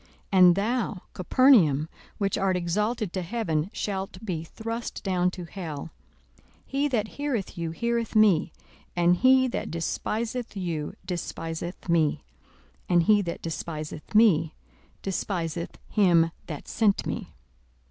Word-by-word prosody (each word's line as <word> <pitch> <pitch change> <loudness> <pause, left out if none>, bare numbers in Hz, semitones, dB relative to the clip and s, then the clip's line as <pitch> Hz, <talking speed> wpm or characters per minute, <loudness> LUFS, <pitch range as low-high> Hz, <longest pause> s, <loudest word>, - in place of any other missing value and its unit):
42:010:015 - - -29 0.3
And 180 -1 +8
thou, 210 -2 -1
Capernaum, 180 - +4 0.3
which 200 -2 0
art 190 -1 +1
exalted 210 +3 -1
to 185 - -1
heaven, 175 -5 -1
shalt 195 -2 -3
be 170 -6 -2
thrust 230 +7 -5
down 180 -2 +2
to 180 -1 -7
hell. 165 -4 -6 0.5
42:010:016 - - -30 0.2
He 280 +2 0
that 225 -6 0
heareth 275 -9 -3
you 165 -1 -2
heareth 235 +6 -2
me; 195 -6 +4 0.4
and 175 0 +4
he 260 +2 +5
that - - -3
despiseth 220 +8 -3
you 165 -5 -3
despiseth 170 -1 -5
me; 165 -3 +2 0.7
and 175 -2 +4
he 210 +3 +5
that 170 -3 -5
despiseth 155 +1 -5
me 195 -8 +5 0.5
despiseth 175 -3 -3
him 170 -5 +4 0.2
that 150 -4 -7
sent 210 -3 +2
me. - - -5
185 Hz, 130 wpm, -27 LUFS, 165-220 Hz, 0.7 s, And